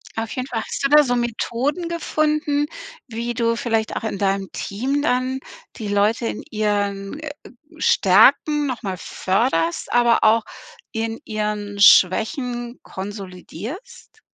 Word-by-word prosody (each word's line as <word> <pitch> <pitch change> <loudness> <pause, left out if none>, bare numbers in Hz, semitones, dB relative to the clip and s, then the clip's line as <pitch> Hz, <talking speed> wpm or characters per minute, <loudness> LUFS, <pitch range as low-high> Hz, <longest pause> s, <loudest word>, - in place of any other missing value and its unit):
Auf 225 0 -3
jeden 255 0 -4
Fall. 230 -4 -2
Hast - - -5
du - - +3
da 300 +1 +7
so 245 -3 0
Methoden 245 +7 -2
gefunden, 305 -3 0 0.4
wie 235 0 -4
du 230 0 +1
vielleicht 225 -3 -1
auch - - -3
in 220 -3 -3
deinem 195 -1 0
Team 260 +8 -2
dann 260 -2 0 0.4
die 215 -3 -6
Leute 210 +3 +1
in - - -5
ihren, 205 +1 -1
äh, 310 -2 -6 0.5
Stärken 280 +6 +4
noch 255 -3 -3
mal 190 -4 -4
förderst, 185 -2 -1
aber 240 -1 +4
auch 220 +1 +5 0.5
in 225 0 -3
ihren 210 -1 -3
Schwächen 240 - +4
konsolidierst? 205 - -9
230 Hz, 135 wpm, -21 LUFS, 205-265 Hz, 0.5 s, da